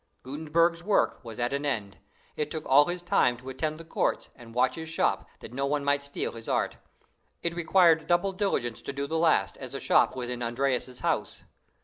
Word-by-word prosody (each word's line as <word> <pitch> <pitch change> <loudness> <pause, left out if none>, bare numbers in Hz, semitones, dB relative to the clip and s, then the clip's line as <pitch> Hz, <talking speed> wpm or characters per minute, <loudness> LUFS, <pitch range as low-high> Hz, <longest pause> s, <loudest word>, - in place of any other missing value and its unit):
Gutenberg's 160 +5 +1
work 200 +3 +1
was 115 -2 -8
at 120 +2 -1
an 140 +1 -1
end. 110 -9 -2 0.4
It 150 -1 -2
took 155 -1 -5
all 140 +2 +6
his 175 +1 -4
time 125 -7 +3
to 130 +2 -9
attend 155 +4 -2
the 165 - -10
courts, 165 - -1
and 115 -1 -14
watch 130 +1 +3
his 160 -1 -6
shop, 165 - 0
that - - -10
no 135 +2 -1
one 145 0 -1
might 140 0 +2
steal 140 0 -3
his 115 -1 -8
art. - - 0 0.7
It 170 - 0
required 170 -1 +4
double 175 +3 +2
diligence 185 - -1
to - - -5
do 140 +1 -2
the 160 +3 -1
last, 165 -1 +2
as 130 -1 -8
the 135 - -4
shop - - +3
was 125 -2 -4
in 125 0 -4
Andreas's 125 +1 -1
house. - - -1
140 Hz, 210 wpm, -28 LUFS, 125-165 Hz, 0.7 s, all